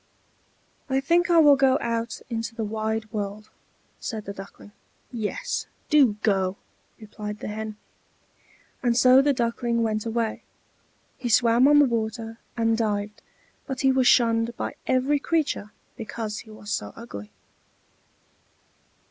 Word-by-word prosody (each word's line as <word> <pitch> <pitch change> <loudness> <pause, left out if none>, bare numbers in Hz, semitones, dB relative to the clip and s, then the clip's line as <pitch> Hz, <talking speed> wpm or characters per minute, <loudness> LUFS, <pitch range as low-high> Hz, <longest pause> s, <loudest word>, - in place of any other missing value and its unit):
"I 265 0 +2
think 340 +6 +2
I 340 - +5
will 295 -3 +8
go 270 -1 +4
out 230 0 -3
into 230 -1 -4
the 225 - -3
wide 220 0 -3
world," 210 0 -5 0.5
said 220 -3 -5
the 200 - -5
Duckling. 195 +1 -11 0.4
"Yes, 220 -4 -3 0.2
do 280 -8 +6
go," 195 -2 +1 0.4
replied 210 -1 -7
the - - -6
Hen. 215 0 -5 1.0
And 240 -2 +1
so 255 +1 +7
the 285 +1 +3
Duckling 235 -2 0
went 215 0 -1
away. 225 -1 -1 0.8
He 245 -2 -3
swam 235 +2 +5
on 295 0 +6
the 290 - +7
water, 225 -1 -3 0.2
and 225 -1 +2
dived, 210 -2 -2 0.5
but 265 -1 -3
he 270 - +4
was 260 -1 +3
shunned 230 0 +3
by - - -3
every 265 +3 +2
creature 300 -9 -1 0.3
because 220 -1 -5
he 225 - -12
was 215 -1 -9
so - - -3
ugly. 105 - -9
230 Hz, 140 wpm, -25 LUFS, 215-255 Hz, 1.0 s, will